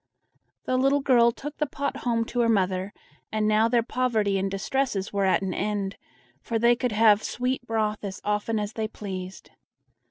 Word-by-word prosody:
The 255 - +1
little 275 +2 +3
girl 240 -3 +5
took 295 +5 -8
the 300 - 0
pot 280 +1 -3
home 230 -2 0
to 245 - -4
her 235 -1 +3
mother, 190 -2 +1 0.4
and 215 -1 0
now 215 +1 +4
their 235 0 +2
poverty 220 -6 0
and 195 +1 -1
distresses 205 0 -2
were 200 -1 +1
at 190 +1 +2
an 190 -1 -2
end, 200 -1 -2 0.5
for 230 - -2
they 235 +2 +4
could 250 0 -1
have 215 -1 +5
sweet 250 +3 -2
broth 215 -2 -1
as 195 -2 -5
often 210 +2 0
as 210 +1 -4
they 220 -1 -2
pleased. 190 -3 -7
220 Hz, 185 wpm, -26 LUFS, 200-240 Hz, 0.5 s, girl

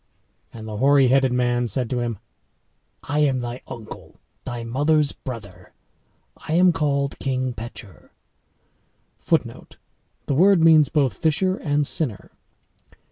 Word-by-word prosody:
And 110 -1 -10
the 105 -1 -6
hoary 135 +1 +4
headed 135 0 +3
man 120 -1 0
said 125 +3 -2
to 125 - -1
him, 120 -3 -3 0.9
"I 145 +1 -2
am 140 -3 +2
thy 120 0 -5
uncle, 110 -2 -11 0.3
thy 120 -1 -5
mother's 145 +5 +1
brother; 115 -7 -10 0.6
I 155 - -6
am 180 +2 +5
called 140 -3 -1
King 130 -2 -2
Pecheur.[Footnote: 115 -2 -7 0.5
The - - -1
word 185 +6 +5
means 160 -3 +5
both 135 -9 0
FISHER 185 +5 +1
and 145 -1 0
SINNER. 135 -8 -2
130 Hz, 125 wpm, -22 LUFS, 120-150 Hz, 0.9 s, am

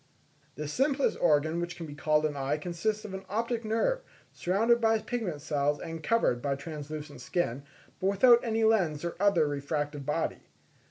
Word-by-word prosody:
The 150 +1 -4
simplest 270 - +1
organ 155 +2 +3
which 175 +1 -4
can 170 - -7
be 150 - -8
called 155 +1 +2
an 150 -1 -1
eye 140 +2 -1
consists 180 +7 -2
of 200 - -7
an 190 0 -5
optic 230 +3 -1
nerve, 225 - +1 0.3
surrounded 225 +6 +2
by 225 0 +4
pigment 215 - -4
cells 145 -1 0
and 165 -1 -6
covered 150 - +2
by 140 0 0
translucent 150 0 -7
skin, 140 -7 -1 0.4
but 190 - 0
without 235 +5 +6
any 225 -2 0
lens 175 -9 +2
or 170 - -3
other 190 -6 +4
refractive 145 0 -3
body. - - -2
170 Hz, 170 wpm, -29 LUFS, 150-220 Hz, 0.4 s, without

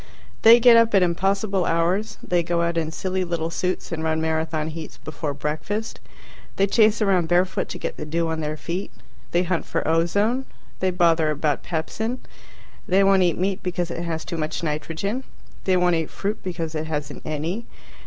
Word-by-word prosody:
They 230 +2 +9
get 235 -1 +8
up 230 -2 +4
at 190 - +6
impossible 195 +2 +1
hours. 175 +6 0
They 175 -1 +1
go 170 0 0
out 170 0 0
in 160 -2 0
silly 185 +2 -2
little 170 -2 -2
suits 180 +2 -2
and 160 -1 -3
run 160 0 +1
Marathon 160 -1 -1
heats 160 0 -8
before 150 -1 -5
breakfast. 180 +10 -3 0.6
They 195 - +3
chase 215 +1 +3
around 185 -5 +2
barefoot 180 +2 +1
to - - -5
get - - -5
the 155 - -5
dew 165 +2 0
on 160 0 -2
their 155 0 -3
feet. 175 +5 -4 0.4
They 175 +1 +2
hunt 180 -1 -1
for - - -2
ozone. 200 +11 +2 0.3
They 185 - +1
bother 170 -3 +3
about 150 -1 0
pepsin. 220 +9 -3 0.7
They 190 +2 +4
won't 195 -1 +5
eat 175 -3 +2
meat 190 +2 -1
because 175 -1 -2
it 170 - -4
has 165 -2 -3
too 170 - -4
much 155 +1 -3
nitrogen. 165 - -2 0.4
They 185 -1 +3
won't 180 -1 +3
eat 165 -2 0
fruit 205 +2 -3
because 170 -3 -4
it 155 0 -3
hasn't 150 -2 -4
any. 165 +9 -3
170 Hz, 185 wpm, -23 LUFS, 160-195 Hz, 0.7 s, They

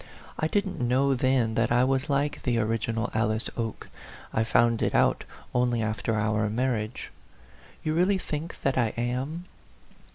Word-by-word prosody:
I 155 - +1
didn't 200 +2 -1
know 130 +3 +2
then 130 -3 +2
that 115 +1 +1
I 120 +1 +4
was 135 +1 +1
like 145 +1 0
the 120 -2 0
original 115 +1 -1
Alice 110 0 0
Oke; 115 -2 -4 0.5
I 110 - +2
found 115 +1 +3
it - - +1
out - - +3 0.3
only 120 -2 +1
after 110 +1 -1
our 105 0 +1
marriage. 115 -1 -2 0.7
You 155 - 0
really 185 +4 +3
think 160 -2 -5
that 135 -1 +1
I 115 -3 +1
am 130 +8 -2
120 Hz, 155 wpm, -27 LUFS, 110-140 Hz, 0.7 s, I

